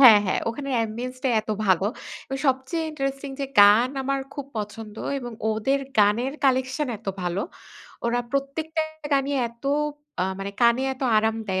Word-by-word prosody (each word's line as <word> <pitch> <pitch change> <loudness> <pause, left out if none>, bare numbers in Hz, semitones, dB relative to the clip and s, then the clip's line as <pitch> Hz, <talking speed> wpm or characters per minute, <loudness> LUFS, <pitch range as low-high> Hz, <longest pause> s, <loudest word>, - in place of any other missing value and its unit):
হ্যাঁ, 235 -6 +10
হ্যাঁ, - - +1
ওখানে 275 +4 -4
অ্যাম্বিয়েন্স 235 +3 -3
টাই 260 - +2
এত 215 - -7 0.2
ভালো 190 0 +4 0.4
এবং 270 - -3
সবচেয়ে 265 +5 0
ইন্টারেস্টিং 275 -1 -3
যে, - - +1 0.2
গান 210 +5 +7
আমার 275 +1 0 0.2
খুব 285 -2 -5
পছন্দ 210 0 -5 0.2
এবং 245 -2 -6 0.2
ওদের 220 +6 +1 0.2
গানের 215 +6 +4
কালেকশন 260 +2 +2
এত 215 - -25 0.2
ভালো। 175 +2 -1 0.6
ওরা 235 +1 +1
প্রত্যেকটা 295 +4 -1 0.3
গানই 275 0 +2 0.2
এত 235 +2 -21 0.6
আ - - +3 0.2
মানে 195 0 -4
কানে 235 +1 +5
এত 260 - -9
আরাম 220 +1 +2
দেয়, 190 -2 0
250 Hz, 160 wpm, -25 LUFS, 215-275 Hz, 0.6 s, হ্যাঁ